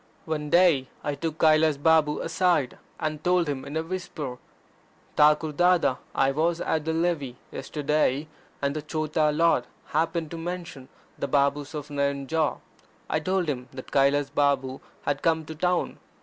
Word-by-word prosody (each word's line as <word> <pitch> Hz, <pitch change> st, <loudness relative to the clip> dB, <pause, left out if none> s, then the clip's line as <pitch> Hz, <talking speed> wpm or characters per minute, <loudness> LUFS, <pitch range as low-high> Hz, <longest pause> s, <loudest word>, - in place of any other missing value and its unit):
One 150 Hz, -2 st, -3 dB
day 170 Hz, -6 st, +4 dB, 0.2 s
I 145 Hz, -, -1 dB
took 160 Hz, +2 st, -4 dB
Kailas 155 Hz, -1 st, +4 dB
Babu 150 Hz, 0 st, +3 dB
aside, 170 Hz, -9 st, +1 dB, 0.2 s
and 155 Hz, -1 st, -3 dB
told 180 Hz, -2 st, +2 dB
him 140 Hz, -2 st, -3 dB
in 145 Hz, +3 st, -5 dB
a 160 Hz, -, 0 dB
whisper: 165 Hz, -7 st, -5 dB, 0.8 s
"Thakur 150 Hz, +1 st, +4 dB
Dada, 175 Hz, -4 st, +3 dB, 0.2 s
I 135 Hz, 0 st, +3 dB
was 165 Hz, +4 st, 0 dB
at 155 Hz, -2 st, -1 dB
the 160 Hz, -, 0 dB
Levee 160 Hz, -7 st, -1 dB
yesterday, 150 Hz, 0 st, 0 dB, 0.4 s
and 140 Hz, +1 st, 0 dB
the 155 Hz, -, -2 dB
Chota 155 Hz, 0 st, 0 dB
Lord 155 Hz, -5 st, +3 dB, 0.2 s
happened 160 Hz, 0 st, -1 dB
to 165 Hz, -, -5 dB
mention 170 Hz, -6 st, -6 dB, 0.3 s
the 140 Hz, -, -1 dB
Babes 140 Hz, +1 st, +1 dB
of 150 Hz, 0 st, -6 dB
Nayanjore. 140 Hz, +2 st, 0 dB, 0.5 s
I 155 Hz, -, +2 dB
told 185 Hz, +2 st, 0 dB
him 130 Hz, -3 st, -3 dB
that 130 Hz, -1 st, -9 dB
Kailas 140 Hz, +1 st, +3 dB
Balm 135 Hz, -2 st, +1 dB, 0.2 s
had 140 Hz, -1 st, -1 dB
come 160 Hz, -1 st, +1 dB
to 160 Hz, -, -7 dB
town. 180 Hz, +3 st, -1 dB
150 Hz, 155 wpm, -26 LUFS, 140-165 Hz, 0.8 s, day